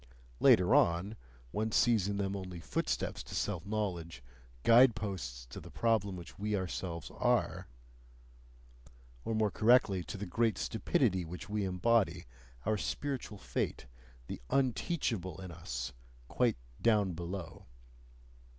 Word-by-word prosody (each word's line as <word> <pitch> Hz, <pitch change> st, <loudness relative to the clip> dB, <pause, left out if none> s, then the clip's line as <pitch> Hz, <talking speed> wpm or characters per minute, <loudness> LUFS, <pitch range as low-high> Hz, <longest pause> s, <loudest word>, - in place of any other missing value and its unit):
Later 90 Hz, 0 st, +6 dB
on 85 Hz, +6 st, +3 dB, 0.4 s
one 110 Hz, -, -1 dB
sees 110 Hz, -4 st, +3 dB
in 100 Hz, 0 st, -1 dB
them 100 Hz, 0 st, -1 dB
only 90 Hz, -3 st, -6 dB
footsteps 65 Hz, -6 st, -2 dB
to -, -, -8 dB
self -, -, -2 dB
knowledge, 90 Hz, -, -3 dB, 0.4 s
guide 120 Hz, 0 st, +7 dB
posts 75 Hz, -, -5 dB
to -, -, -6 dB
the -, -, -11 dB
problem 110 Hz, -4 st, +1 dB
which 90 Hz, +1 st, -10 dB
we 105 Hz, +1 st, 0 dB
ourselves 90 Hz, -3 st, -4 dB
ARE -, -, +1 dB, 1.6 s
or 115 Hz, -, -1 dB
more 110 Hz, -2 st, +2 dB
correctly 110 Hz, -5 st, +4 dB
to 90 Hz, -, -6 dB
the 100 Hz, -, -4 dB
great 110 Hz, +2 st, +1 dB
stupidity 95 Hz, -1 st, +1 dB
which 85 Hz, +4 st, -8 dB
we 105 Hz, -1 st, 0 dB
embody, 90 Hz, -2 st, +2 dB, 0.4 s
our 110 Hz, +1 st, +2 dB
spiritual 135 Hz, -6 st, -3 dB
fate, 95 Hz, -, -3 dB, 0.4 s
the -, -, -7 dB
UNTEACHABLE 120 Hz, -, 0 dB
in 95 Hz, -2 st, -7 dB
us, 65 Hz, -7 st, -5 dB, 0.3 s
quite 120 Hz, -, +1 dB, 0.2 s
"down 105 Hz, -5 st, +3 dB
below." 85 Hz, -1 st, -6 dB
100 Hz, 130 wpm, -33 LUFS, 85-110 Hz, 1.6 s, guide